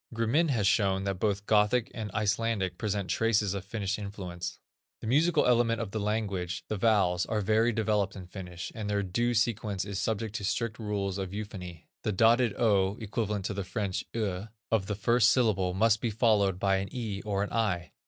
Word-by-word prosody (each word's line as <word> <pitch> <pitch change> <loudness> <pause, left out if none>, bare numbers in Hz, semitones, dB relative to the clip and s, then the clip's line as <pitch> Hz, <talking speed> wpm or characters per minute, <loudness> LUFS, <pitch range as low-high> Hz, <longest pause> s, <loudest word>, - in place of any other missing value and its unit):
Grimin 125 +9 +2
has 115 -7 +1
shown 95 -2 +2
that 100 -2 -2
both 100 -1 0
Gothic 110 +4 +3
and 110 -2 -5
Icelandic 105 -3 0
present 100 -2 -1
traces 105 +1 +1
of 100 -2 -4
Finnish 105 0 -3
influence. 95 -4 -6 0.4
The - - -9
musical 150 +9 +3
element 115 -2 +3
of 110 -4 -4
a 110 - -1
language, 100 -4 -2
the 110 - -1
vowels, 95 -4 +2
are 110 -1 0
well 110 +3 +3
developed 105 -3 0
in 95 -2 -8
Finnish, 90 -1 -7
and 105 -2 -5
their 100 0 +1
due 120 +6 0
sequence 105 -4 0
is 100 -1 -4
subject 110 -1 -2
to - - -7
strict 105 +2 -1
rules 100 -3 -2
of 95 0 -4
euphony. 95 -6 -7 0.2
The 105 - -1
dotted 115 +2 +4
ö 100 -4 +3
(equivalent 105 -2 -2
to 105 - -2
the 100 0 -3
French 95 0 -2
eu) 105 -3 -2 0.2
of 105 -4 +1
the 105 - -2
first 115 +3 +4
syllable 100 -8 +2
must 110 +1 +3
be 120 - 0
followed 105 -4 +2
by 95 0 +2
an 95 0 -3
e 110 -6 -4
or 100 -2 -1
an 105 - -5
i. 100 -7 0
105 Hz, 195 wpm, -29 LUFS, 95-115 Hz, 0.4 s, dotted